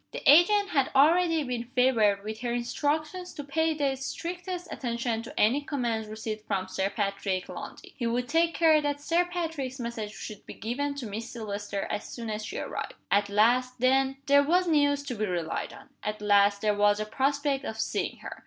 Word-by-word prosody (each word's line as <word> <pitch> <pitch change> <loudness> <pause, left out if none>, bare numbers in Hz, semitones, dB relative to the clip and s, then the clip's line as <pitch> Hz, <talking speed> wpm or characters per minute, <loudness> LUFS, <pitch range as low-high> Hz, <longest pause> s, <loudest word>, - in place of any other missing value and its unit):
The - - -6
agent 395 +7 +6
had 275 -7 +2
already 325 +3 +4
been 245 -3 -3
favored 220 -6 +3
with 215 +1 -5
her 240 0 -2
instructions 300 +9 -2
to 290 - -5
pay 320 +3 0
the 280 -3 0
strictest 350 +6 -5
attention 235 -2 -2
to 230 - -8
any 245 +7 +4
commands 240 -7 -2
received 215 0 -6
from 185 -1 -1
Sir 190 +1 -1
Patrick 200 -3 -2
Lundie. - - -9
He 235 - -2
would 245 +2 -1
take 330 +2 +2
care 315 0 +5
that 290 -1 -1
Sir 335 +4 +2
Patrick's 325 -7 -4
message 235 -3 -4
should 215 - -8
be - - -8
given 280 +6 -2
to 275 -4 -5
Miss 220 +2 -5
Silvester 205 -3 -4
as 210 - -3
soon 230 -2 -5
as 215 0 -3
she 385 - -5
arrived. - - -5 0.2
At 205 0 +3
last, 245 +5 +3
then, 265 +2 +3
there 280 0 +6
was 350 +5 +2
news 285 -3 +3
to 280 - -4
be 215 -2 -2
relied 175 -3 -2
on! - - -14
At 210 0 -3
last 205 -1 +4
there 210 -1 +2
was 205 0 +3
a 215 - -1
prospect 275 +4 0
of 220 -5 -5
seeing - - -2
her! - - -7
250 Hz, 195 wpm, -28 LUFS, 215-290 Hz, 0.2 s, agent